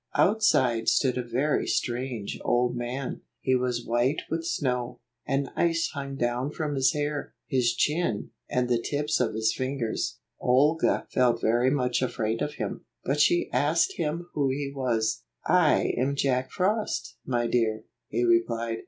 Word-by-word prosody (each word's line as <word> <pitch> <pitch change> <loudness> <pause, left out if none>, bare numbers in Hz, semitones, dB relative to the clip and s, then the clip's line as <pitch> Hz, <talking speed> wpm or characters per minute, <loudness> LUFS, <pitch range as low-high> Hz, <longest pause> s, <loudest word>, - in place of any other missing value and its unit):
Outside 130 - +3
stood 130 -3 +3
a - - -1
very 130 +5 0
strange 120 -3 -2
old 120 0 +2
man. 125 +2 -4 0.2
He 130 - +1
was 125 -1 -1
white 120 +5 +1
with 165 0 -1
snow; 125 -6 -2 0.3
and 135 -1 0
ice 165 -1 +1
hung 140 -2 -5
down 125 +1 -1
from 150 -2 -2
his 135 +2 +3
hair, 145 -1 -3
his 125 -5 +1
chin, 150 -9 0 0.2
and 125 -1 +1
the 120 -1 +1
tips 150 +4 -1
of 115 -4 0
his 110 0 +1
fingers. 130 -4 -2 0.2
Olga 145 +6 +3
felt 120 -2 +3
very 120 +3 +3
much 125 -3 +1
afraid 115 -3 -1
of 150 0 -2
him, - - -4 0.2
but 140 +3 0
she 175 +4 +4
asked 145 +6 +2
him 170 +1 -2
who 140 -2 +1
he 140 +1 -3
was. 115 -5 0 0.2
"I - - +3
am 135 +3 0
Jack 130 -2 +1
Frost, 200 - -1
my 120 -2 0
dear," 110 -2 +1 0.2
he 120 +3 -1
replied. 115 -1 +1
130 Hz, 155 wpm, -27 LUFS, 120-145 Hz, 0.3 s, she